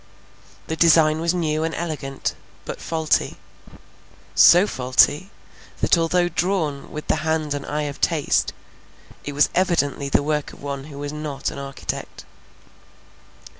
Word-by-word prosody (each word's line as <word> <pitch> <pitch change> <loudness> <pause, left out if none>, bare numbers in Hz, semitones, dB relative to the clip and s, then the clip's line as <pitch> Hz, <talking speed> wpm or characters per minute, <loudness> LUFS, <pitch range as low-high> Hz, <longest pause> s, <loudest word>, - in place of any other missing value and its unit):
The 160 - -3
design 160 -1 +5
was 170 0 +2
new 155 -3 0
and 160 0 -2
elegant, 150 -5 -4 0.3
but - - -6
faulty; 160 -2 0 1.0
so 175 +3 +7
faulty, 145 +3 +2 0.5
that - - +4
although 175 +1 +2
drawn 170 -6 -1
with 150 - -6
the - - +1
hand 155 -1 -1
and 145 -1 -5
eye 150 +1 -2
of 145 -1 -6
taste, 155 -4 +1 0.7
it 145 - -5
was 145 +1 +3
evidently 155 -6 +1
the 140 - +2
work 150 0 -2
of - - -15
one 140 -1 -5
who 145 -2 -11
was 145 +1 -5
not 150 -2 -4
an - - -8
architect. 140 0 -6
155 Hz, 140 wpm, -22 LUFS, 145-165 Hz, 1.0 s, so